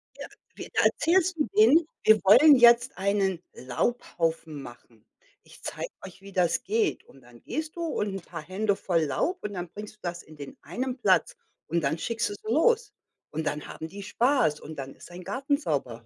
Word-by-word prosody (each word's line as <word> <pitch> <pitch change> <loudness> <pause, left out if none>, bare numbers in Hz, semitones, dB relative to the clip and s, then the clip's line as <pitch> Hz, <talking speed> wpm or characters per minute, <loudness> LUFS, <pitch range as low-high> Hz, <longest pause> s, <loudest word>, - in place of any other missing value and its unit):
Ja, - - -8 0.3
wie - - -8
da - - +3
erzählst 365 0 +2
du 300 - 0
denen, 335 -7 +6 0.2
wir 220 0 +6
wollen 280 +10 +8
jetzt 240 0 +5
einen 195 -2 0
Laubhaufen 160 - -2
machen. 120 -3 -14 0.4
Ich - - -18
zeige - - -5 0.2
euch, 190 0 -12
wie 200 - -12
das 180 -2 +1
geht 215 +4 0
und 135 - -19
dann 120 -1 -18
gehst 310 +4 -5
du 340 - -6
und 305 -11 -1
'n 195 - -5
paar 170 -1 -8
Hände 195 +6 -1
voll 170 -4 0
Laub 155 - -1
und 205 - -4
dann 175 -2 -5
bringst 210 +3 -9
du - - -37
das 175 -1 -4
in 155 - -15
den 140 -2 -10
einen 250 - -4
Platz 195 -6 +2 0.3
und 170 +1 0
dann 155 +2 0
schickst 230 +6 -2
du 205 - -5
sie 215 +2 -6
los. 465 - +3 0.4
Und 160 +1 -3
dann 150 - -3
haben 160 - -7
die 200 +3 -9
Spaß 235 - +1
und 155 - -10
dann 135 -1 -7
ist - - -14
dein 180 +1 -10
Garten 275 +6 -1
sauber. 130 - -3
195 Hz, 200 wpm, -27 LUFS, 160-245 Hz, 0.4 s, wollen